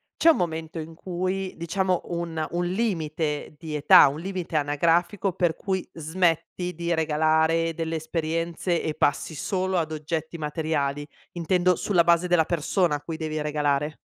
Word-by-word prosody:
c'è 330 - +5
un 320 - +5
momento 160 -1 -3
in 160 +1 -8
cui 185 +2 -3
diciamo 185 +2 0
un 170 -2 -3
un 175 +1 -1
limite 160 -7 -2
di 155 -2 -6
età, 145 -1 +7
un 145 +3 -3
limite 185 -3 -5
anagrafico 170 +6 +1
per 175 -3 +1
cui 190 -2 -2
smetti 175 +2 -1
di 170 0 -1
regalare 160 +1 +2
delle 165 0 -3
esperienze 165 +2 -2
e 155 - -2
passi 150 +2 0
solo 185 +4 -1
ad 160 -2 -1
oggetti 160 +2 -4
materiali, 150 -2 -2 0.3
intendo 180 +1 +2
sulla 175 -3 +2
base 170 +1 +4
della 170 -3 +3
persona 170 0 +1
a 145 - -5
cui 160 +1 -6
devi 155 -1 -3
regalare? 150 0 0
165 Hz, 155 wpm, -25 LUFS, 155-175 Hz, 0.3 s, età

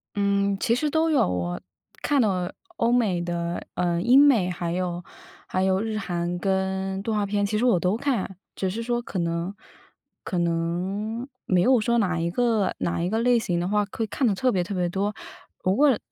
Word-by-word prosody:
嗯， 200 -1 +1
其 235 +1 +2
实 300 +4 0
都 320 +2 +2
有。 295 -4 +4
我 90 -1 -2 0.4
看 285 -3 +2
到 210 -4 +2
了 180 -1 -3 0.2
欧 235 -6 +2
美 210 -8 +2
的， 170 0 -3
呃， 175 -1 0
英 245 +7 +6
美， 245 -11 +5
还 170 -1 -3
有 175 -1 -2 0.4
还 185 - 0
有 190 0 +2
日 220 -1 -2
韩， 175 -3 -2
跟 190 +1 -1
动 220 +2 -2
画 205 -1 +1
片， 205 0 0
其 210 +1 -1
实 225 - 0
我 235 -8 +4
都 180 +4 +1
看。 230 -8 -2 0.2
只 190 - -2
是 225 +5 -4
说 240 0 -1
可 205 - -6
能 170 +3 -2 0.7
可 185 - -2
能 180 +7 -1 0.2
没 180 -2 +3
有 255 +5 +5
说 235 +2 +1
哪 180 -5 +1
一 170 +1 0
个 220 0 +1
哪 170 - -1
一 175 - 0
个 220 +3 0
类 240 0 +4
型 180 -6 -1
的 175 - -1
话， 210 0 +2
会 225 - -2
看 250 +4 0
得 200 - +2
特 255 +5 +2
别 185 - +1
特 180 - -5
别 180 -1 0
多。 200 +3 -1 0.5
如 185 - +2
果 280 -5 +5
195 Hz, 225 characters per minute, -25 LUFS, 175-230 Hz, 0.7 s, 英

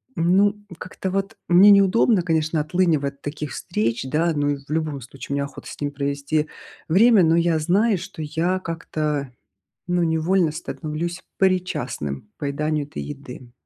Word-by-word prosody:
ну, 190 +5 +3 0.2
как-то 185 0 -5
вот 195 +1 -2
мне 185 +4 +7
неудобно, 200 +1 +5
конечно, 160 -2 0
отлынивать 155 -3 +1
от 140 - -36
таких 145 0 -5
встреч, 115 +3 -2
да. 160 +5 +1
Ну 145 0 +1
и 140 - -1
в - - -29
любом 155 -3 -1
случае 135 +3 -8
мне 140 - 0
охота 140 0 -9
с - - -10
ним 145 -1 -2
провести 140 +2 -1 0.4
время. 205 +4 +6
Но 165 0 +4
я 170 -1 +2
знаю, 200 +7 +2
что 185 -2 -8
я 170 +5 0
как-то 155 -5 -3 0.6
ну 175 0 +1
невольно 165 +1 +2
становлюсь 165 +2 -5
причастным 180 - -1
к 105 - -35
поеданию 150 +1 -1
этой 145 - -6
еды. 130 -4 -9
160 Hz, 160 wpm, -23 LUFS, 145-180 Hz, 0.6 s, мне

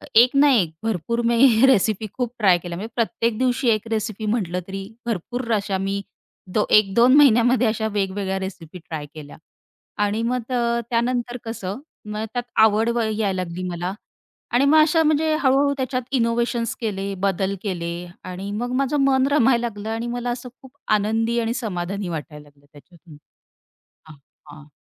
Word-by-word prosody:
एक 240 +2 +8
ना 285 +1 +6
एक, 175 -9 +2
भरपूर 225 +2 -1
मी 235 +1 +5
रेसिपी 215 -3 +2
खूप 245 -2 -3
ट्राय 190 -4 +5
केल्या 170 0 -7
म्हणजे 220 +4 -6
प्रत्येक 230 -1 0
दिवशी 255 0 0
1 215 0 +1
रेसिपी 220 -1 -2
म्हटलं 195 -5 -1
तरी 195 0 -5 0.2
भरपूर 235 +3 -3
अशा 200 -2 0
मी 195 +1 -2 0.5
दो 210 - +2
1-2 215 +5 +5
महिन्यामध्ये 245 -3 +5
अशा 220 0 -1
वेगवेगळ्या 195 -1 -1
रेसिपी 180 -2 -7
ट्राय 160 -2 -7
केल्या. 150 -2 -11 0.7
आणि 210 +2 0
मग 250 +1 0 0.5
त्यानंतर 240 +1 -1
कसं 215 -1 -5 0.3
मग 215 +1 -3
त्यात 245 -1 -2 0.2
आवड 220 +2 +2
व 235 - +1
यायला 215 -3 0
लागली 175 +1 -6
मला 175 +2 -3 0.6
आणि 255 +3 +4
मग 310 +3 +5
अशा 320 +1 +3
म्हणजे 310 0 +2
हळू-हळू 280 +1 +3
त्याच्यात 255 -1 -2 0.2
इनोवेशन्स 230 0 0
केले, 200 -2 -3
बदल 195 +1 -1
केले 175 -5 -3 0.3
आणि 185 +2 -6
मग 240 +4 -3
माझं 275 +2 0
मन 265 0 +3
रमायला 245 -4 +4
लागलं 210 0 -7
आणि 225 +2 -3
मला 245 0 -3
असं 245 +1 -6
खूप 265 -1 -15 0.3
आनंदी 225 +3 0
आणि 230 0 -1
समाधानी 200 -5 -4
वाटायला 150 -2 -6
लागलं 145 0 -28
त्याच्यातून. 160 +1 -17 0.9
हां, 155 - -12 0.4
हां. 150 0 -13
220 Hz, 160 wpm, -22 LUFS, 190-245 Hz, 0.9 s, एक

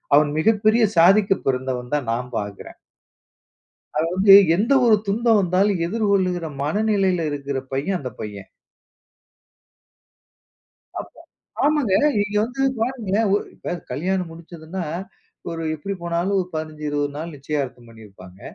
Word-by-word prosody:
அவன் 145 0 +4
மிகப்பெரிய 215 +5 +3
சாதிக்க 195 +4 +5
பிறந்தவன்னு 125 -1 -2
தான் 140 -6 -2
நான் 125 +2 -4
பார்க்கிறேன். 100 -1 -8 1.2
அது 160 - +1
வந்து 195 +1 +7 0.2
எந்த 220 +8 +1
ஒரு 225 -3 +6
துன்பம் 225 +2 +2
வந்தாலும் 185 0 +1
எதிர்கொள்ளுகிற 190 -4 0 0.2
மனநிலையில 190 0 +1
இருக்கிற 140 -1 -3
பையன், 145 +9 -1
அந்த 130 -5 -6
பையன். 100 -2 -7 2.5
அப்போ - - -12 0.4
ஆமாங்க. 290 -8 +2 0.3
நீங்க 205 0 -1
வந்து 260 +4 -4 0.2
பாருங்களேன். 225 -3 0
ஒ - - +5 0.2
இப்ப - - -5 0.2
கல்யாணம் 180 +5 -2
முடிச்சுதுன்னா, 170 +2 -8 0.7
ஒரு 165 0 -5
எப்படி 175 +6 -5
போனாலும் 175 +3 -1
ஒரு 180 - -4
15, 155 -1 -5
20 145 -1 -2
நாள் 165 +2 -6
நிச்சயார்த்தம் 135 -4 -4
பண்ணியிருப்பாங்க. 100 -5 -15
170 Hz, 120 wpm, -22 LUFS, 145-200 Hz, 2.5 s, வந்து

